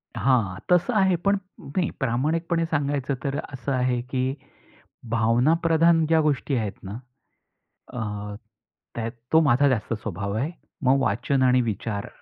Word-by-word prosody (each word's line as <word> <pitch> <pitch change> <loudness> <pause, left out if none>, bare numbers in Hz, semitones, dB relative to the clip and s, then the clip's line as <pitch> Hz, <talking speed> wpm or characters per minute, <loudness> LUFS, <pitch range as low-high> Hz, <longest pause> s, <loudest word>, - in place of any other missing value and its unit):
हां, 115 -9 +1
तसं 180 +8 +3
आहे. 190 -2 +4
पण 200 +4 +1 0.4
मी 175 -4 +2
प्रामाणिकपणे 160 +7 0
सांगायचं 145 -3 -1
तर 140 0 -1 0.2
असं 135 +1 -4
आहे 125 -2 +1
की 130 +1 -2 0.8
भावनाप्रधान 160 +9 +3
ज्या 160 +1 +4
गोष्टी 150 -2 0
आहेत 110 -4 -1
ना, 100 +4 -6 1.0
अ, 105 -3 -4 0.6
त्यात 115 0 -3 0.2
तो 160 - +8
माझा 140 -1 +4
जास्त 115 -3 -1
स्वभाव 100 -2 -4
आहे. 130 +10 -1 0.3
मग 135 +2 +5
वाचन 130 +4 +1
आणि 125 0 +4
विचार 105 -2 -3
130 Hz, 135 wpm, -25 LUFS, 115-160 Hz, 1.0 s, तो